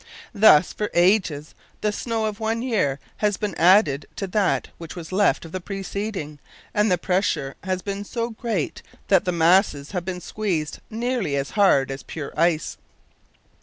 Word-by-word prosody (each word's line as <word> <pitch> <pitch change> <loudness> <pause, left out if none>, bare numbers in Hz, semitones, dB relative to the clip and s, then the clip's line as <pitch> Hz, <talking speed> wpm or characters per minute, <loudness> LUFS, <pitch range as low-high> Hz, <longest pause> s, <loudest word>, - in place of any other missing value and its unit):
Thus, 200 -6 +6
for 210 - -3
ages, 175 -5 +2 0.3
the 210 - +1
snow 225 +1 -2
of 210 -1 -3
one 225 +1 -1
year 190 - 0 0.2
has 210 -2 +1
been 210 -3 -3
added 170 -5 +4
to 195 - -3
that 195 0 0
which 165 -1 -8
was 170 -1 -8
left 195 -2 +2
of 165 - -10
the 185 - -4
preceding, 195 -5 -5 0.3
and 210 -1 +2
the 180 - +3
pressure 170 -6 0
has 185 -1 -2
been 200 0 -4
so 230 +3 -3
great 220 - -3 0.3
that 195 0 +4
the 180 - +1
mass 175 +4 +4
has 140 0 -10
been 180 0 -4
squeezed 175 -6 -3
nearly 230 - -1
as 140 -1 -2
hard 165 -10 +3
as 135 - -5
pure 150 -3 -7
ice. 165 0 +1
190 Hz, 165 wpm, -23 LUFS, 160-210 Hz, 0.3 s, Thus